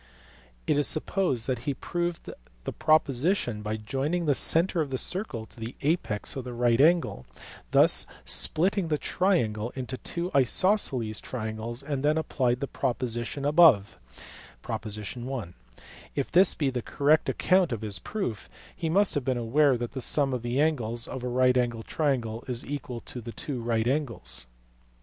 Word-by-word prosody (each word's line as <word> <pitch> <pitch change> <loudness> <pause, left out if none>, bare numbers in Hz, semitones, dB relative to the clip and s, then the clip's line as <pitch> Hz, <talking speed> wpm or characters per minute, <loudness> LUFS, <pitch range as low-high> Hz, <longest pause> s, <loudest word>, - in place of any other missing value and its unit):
It 145 - +2
is 145 - +4
supposed 155 - 0
that 130 -3 -1
he 140 - -1
proved 175 +3 -3 0.4
the - - -4
proposition 155 - +1
by 105 +1 -3
joining 135 +11 -2
the 145 - +3
centre 165 +5 +2
of 150 - -2
the 130 - -2
circle 150 - -1
to 115 - -16
the 115 +2 -6
apex 145 -9 -1
of 135 - -4
the 125 0 -7
right 120 +1 +3
angle, 165 - +2 0.4
thus - - +5 0.2
splitting 185 +2 +2
the 155 -2 0
triangle 120 - 0
into 130 0 -5
two 175 +6 -4
isosceles 130 - +3
triangles, 115 +1 -5
and 140 -2 -3
then 150 +2 +2
applied 125 -5 0
the 140 - -2
proposition 125 +1 -2
(i) - - +3
above: 145 - +5 2.2
if - - -2
this 185 +2 +5
be 140 -4 0
the 125 -1 -3
correct 150 +6 +2
account 185 -4 +2
of 115 -3 -3
his 100 -4 0
proof, 125 - -4 0.3
he 165 - -3
must 195 +4 +3
have 145 - -1
been 130 -1 0
aware 130 +3 +3
that 120 0 -4
the 135 - -5
sum 135 +2 +2
of 125 - -2
the 120 +3 -2
angles 120 -7 0
of 130 - -6
a - - -2
right 125 +1 +3
angled 120 -2 -1
triangle 120 -7 -1
is 125 -1 -2
equal 130 -4 -5
to 125 - -7
two 120 +3 -5
right 115 -1 0
angles. 115 - -2
130 Hz, 165 wpm, -27 LUFS, 120-155 Hz, 2.2 s, thus